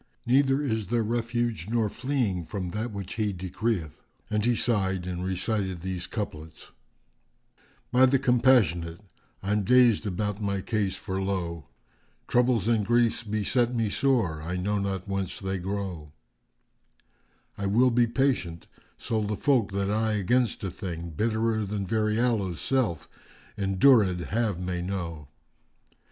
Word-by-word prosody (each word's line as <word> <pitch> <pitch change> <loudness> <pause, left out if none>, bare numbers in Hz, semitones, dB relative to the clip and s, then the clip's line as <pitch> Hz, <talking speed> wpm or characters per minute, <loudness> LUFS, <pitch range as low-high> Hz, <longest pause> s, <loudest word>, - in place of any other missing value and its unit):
Neither 135 +2 +3
is 110 -7 -1
there 120 +1 +1
refuge 115 -4 -1
nor 115 -2 +1
fleeing 125 -6 -1
from 90 +1 -5
that 110 +5 -3
which 100 -1 -6
He 105 -2 +1
decreeth!" 95 -3 -3 0.3
And 105 -1 +1
he 120 +1 +3
sighed 95 -6 0
and 90 -1 -4
recited 95 -1 -2
these 95 0 -4
couplets, 80 -7 -6 1.2
"By 130 +1 +6
the 135 +1 +3
Compassionate, 120 - +3 0.4
I'm 105 +2 +1
dazed 120 -1 +4
about 105 +2 -2
my 100 -1 -1
case 105 -2 -1
for 95 -2 -4
lo! 85 -4 -3 0.3
* - - -39
Troubles 120 -4 +2
and 115 -3 +2
griefs 120 +1 +2
beset 115 +3 0
me 115 -3 0
sore; 110 - +1
I 90 +3 -3
know 100 +3 0
not 95 -1 -3
whence 95 -2 -3
they 95 -1 -3
grow. 90 -5 -4 1.4
I 100 - -3
will 120 +6 +4
be 120 0 +3
patient, 115 -10 0 0.3
so 110 -1 -2
the 105 0 -2
folk, 130 -8 +2
that 100 0 0
I 110 +1 +1
against 110 +3 +1
a 95 - -2
thing 85 -3 -6
* - - -13
Bitt'rer 110 +2 0
than 100 -1 -3
very 110 +1 0
aloes' 105 -8 0
self,[FN#400] 100 - -3
endurèd 100 -7 +5
have, 110 -4 0
may 90 -1 -3
know. 85 -5 -4
105 Hz, 145 wpm, -27 LUFS, 95-115 Hz, 1.4 s, By